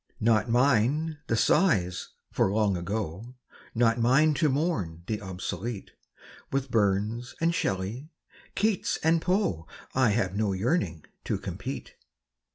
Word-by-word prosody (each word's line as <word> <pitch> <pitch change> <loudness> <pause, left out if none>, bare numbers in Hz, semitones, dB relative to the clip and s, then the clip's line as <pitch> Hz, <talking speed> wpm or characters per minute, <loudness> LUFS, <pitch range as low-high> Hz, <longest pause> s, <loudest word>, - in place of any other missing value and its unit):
Not 110 0 +2
mine 140 +5 +2
the 115 - +1
sighs 100 - +2 0.2
for 95 - +2
Long 105 -2 +2
Ago; 100 +5 -4 0.4
Not 115 0 +3
mine 135 +7 +4
to 155 +1 +2
mourn 115 - -1
the 105 +1 -3
obsolete; 95 +3 -5 0.6
With 135 -1 -1
Burns 110 +3 0
and 165 +1 +2
Shelley, 115 - -2 0.5
Keats 210 -2 +1
and 160 +1 +3
Poe 170 - 0 0.3
I 130 -3 +3
have 100 -3 0
no 105 -2 +1
yearning 95 - -1 0.2
to - - 0
compete. - - -6
115 Hz, 125 wpm, -28 LUFS, 95-140 Hz, 0.6 s, mine